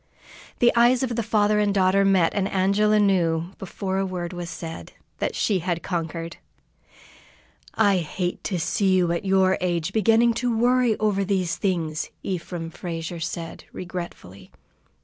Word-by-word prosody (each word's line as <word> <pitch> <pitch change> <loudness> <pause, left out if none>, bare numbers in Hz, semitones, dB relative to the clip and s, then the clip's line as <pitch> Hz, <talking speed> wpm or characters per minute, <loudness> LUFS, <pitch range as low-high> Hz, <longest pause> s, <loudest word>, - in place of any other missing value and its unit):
The 240 0 +3
eyes 240 +2 +4
of 245 -2 -1
the 230 - 0
father 210 -1 +2
and 205 -1 +2
daughter 195 0 +3
met, 190 -4 +3
and 195 -2 0
Angela 200 +3 +2
knew, 175 -4 +1
before 190 0 -3
a - - +1
word 180 -1 -4
was 175 -1 -5
said, 165 -1 -8 0.3
that - - -2
she 200 -4 +1
had 170 -1 -2
conquered. 165 -1 -4 1.4
"I 205 -3 +4
hate 175 +1 -3
to 190 - -1
see 190 +4 +1
you 175 -2 +2
at 170 +3 -2
your 190 -1 +3
age, 175 0 -1
beginning 225 +2 +4
to 240 -2 0
worry 245 -1 +3
over 205 -2 +1
these 185 -3 0
things," 165 -5 -2
Ephraim 175 -2 -4
Frazier 165 -1 -5
said, 165 0 -5
regretfully. 175 - -8
185 Hz, 150 wpm, -24 LUFS, 170-205 Hz, 1.4 s, eyes